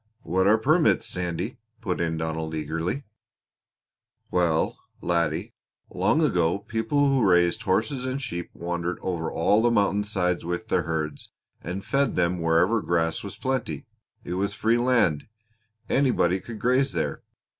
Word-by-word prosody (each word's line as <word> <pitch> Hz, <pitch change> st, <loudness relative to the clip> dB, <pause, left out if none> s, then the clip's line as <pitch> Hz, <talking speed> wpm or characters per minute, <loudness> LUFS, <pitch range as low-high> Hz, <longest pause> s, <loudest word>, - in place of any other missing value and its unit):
"What 95 Hz, +2 st, +1 dB
are 110 Hz, +2 st, +6 dB
permits, 155 Hz, +9 st, +3 dB
Sandy?" 90 Hz, -1 st, -3 dB, 0.2 s
put 95 Hz, -6 st, -2 dB
in 80 Hz, -1 st, -1 dB
Donald 80 Hz, 0 st, -3 dB
eagerly. 80 Hz, -, -2 dB, 1.3 s
"Well, 85 Hz, -3 st, +1 dB, 0.2 s
laddie, 85 Hz, -3 st, -1 dB, 0.4 s
long 105 Hz, -, +2 dB
ago 90 Hz, -, +2 dB
people 110 Hz, +7 st, 0 dB
who 135 Hz, -3 st, +2 dB
raised 90 Hz, -2 st, +3 dB
horses 115 Hz, +8 st, 0 dB
and 130 Hz, +1 st, -2 dB
sheep 85 Hz, -11 st, -5 dB
wandered 85 Hz, +1 st, -3 dB
over 85 Hz, -3 st, -2 dB
all 105 Hz, +6 st, +3 dB
the 120 Hz, -, +4 dB
mountainsides 100 Hz, -4 st, +1 dB
with 85 Hz, +6 st, -4 dB
their 90 Hz, -, +2 dB
herds, 75 Hz, -2 st, -3 dB, 0.3 s
and 90 Hz, +4 st, -5 dB
fed 140 Hz, 0 st, +1 dB
them 90 Hz, 0 st, +1 dB
wherever 85 Hz, +7 st, +3 dB
grass 80 Hz, -2 st, 0 dB
was 100 Hz, -, -7 dB
plenty. 130 Hz, -, -3 dB, 0.4 s
It -, -, -5 dB
was 100 Hz, +2 st, -1 dB
free 115 Hz, +3 st, +2 dB
land. 120 Hz, -, +2 dB, 0.6 s
Anybody 120 Hz, -9 st, +2 dB
could 110 Hz, +4 st, -8 dB
graze 130 Hz, +4 st, +2 dB
there. -, -, -2 dB
90 Hz, 140 wpm, -25 LUFS, 85-115 Hz, 1.3 s, are